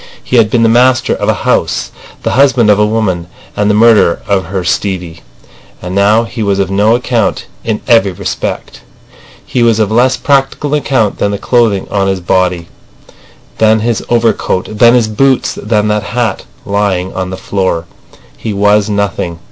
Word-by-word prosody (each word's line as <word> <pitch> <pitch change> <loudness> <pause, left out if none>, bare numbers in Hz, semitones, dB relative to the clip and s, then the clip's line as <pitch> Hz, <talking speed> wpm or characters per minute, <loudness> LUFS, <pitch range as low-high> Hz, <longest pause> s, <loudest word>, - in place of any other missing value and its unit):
He 125 - 0
had 110 -2 +4
been 115 0 +1
the - - +4
master 120 +2 +3
of - - -2
a - - +3
house, - - 0 0.3
the - - -1
husband 130 -5 +3
of 105 - +2
a 105 - +4
woman, 100 -6 -1 0.3
and 105 0 0
the 105 - +2
murderer 110 -5 +4
of 100 -2 0
her 95 -1 -4
Stevie. 90 -2 -3 0.6
And 90 +1 -6
now 105 +3 +3
he 115 0 -7
was 100 -2 0
of 95 -1 -1
no 105 +4 +3
account 120 -4 -1 0.2
in 110 -2 -2
every 115 -5 +3
respect. 95 0 -5 0.6
He 125 - -2
was 115 -2 +3
of 110 -2 0
less 125 +3 +2
practical 140 +1 0
account 135 -8 0
than 100 - +1
the 100 - -2
clothing 110 -4 +1
on 100 -1 0
his 95 -1 -1
body, 90 -1 0 0.9
than 110 0 +3
his 115 0 -1
overcoat, 115 -4 0
than 120 0 +6
his 120 -3 +2
boots—than 110 -3 0
that 105 0 0
hat 120 +2 -3 0.2
lying 100 -2 -1
on 95 -1 -4
the 95 - -6
floor. 95 -5 -2 0.5
He 110 - -5
was 105 +1 +2
nothing. 100 -4 -2
105 Hz, 170 wpm, -12 LUFS, 95-115 Hz, 0.9 s, than